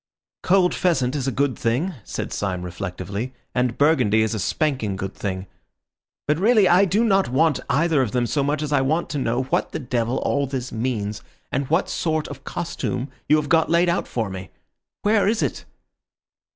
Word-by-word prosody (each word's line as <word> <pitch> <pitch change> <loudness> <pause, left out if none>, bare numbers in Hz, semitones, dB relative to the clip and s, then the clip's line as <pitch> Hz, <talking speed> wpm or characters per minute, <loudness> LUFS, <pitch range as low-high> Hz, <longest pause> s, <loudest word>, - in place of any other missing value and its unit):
"Cold 185 -1 +3
pheasant 135 -8 +1
is 135 -2 -2
a - - +1
good 140 0 0
thing," 130 +12 0
said - - -5
Syme 95 -3 -2
reflectively, 100 +7 -5 0.2
"and 125 -1 0
Burgundy 125 -8 +4
is 110 - -1
a 110 - -2
spanking 130 - 0
good 95 +1 -4
thing. 95 -2 -4 0.8
But 150 +2 +2
really 215 -1 +5
I 180 +3 +5
do 200 +5 +2
not 195 - +3
want 150 +3 +2
either 155 -1 +3
of 125 - 0
them 125 +1 +1
so 145 +4 0
much 145 +2 0
as 150 -1 -2
I 140 - +4
want 155 +6 0
to 145 - -2
know 125 0 0
what 130 - -1
the - - -2
devil 120 -3 -1
all 140 -1 +1
this 130 -1 -4
means, 110 -3 -2 0.3
and 135 0 -1
what 165 +4 +2
sort 155 -2 -1
of - - -9
costume 135 -6 -3 0.2
you 150 - +7
have 150 -1 0
got 160 +1 +3
laid 170 +1 +3
out 170 - 0
for 110 -5 -2
me. 95 -2 -7 0.5
Where 210 -1 +3
is 220 +1 +2
it?" - - -3
135 Hz, 190 wpm, -23 LUFS, 115-165 Hz, 0.8 s, you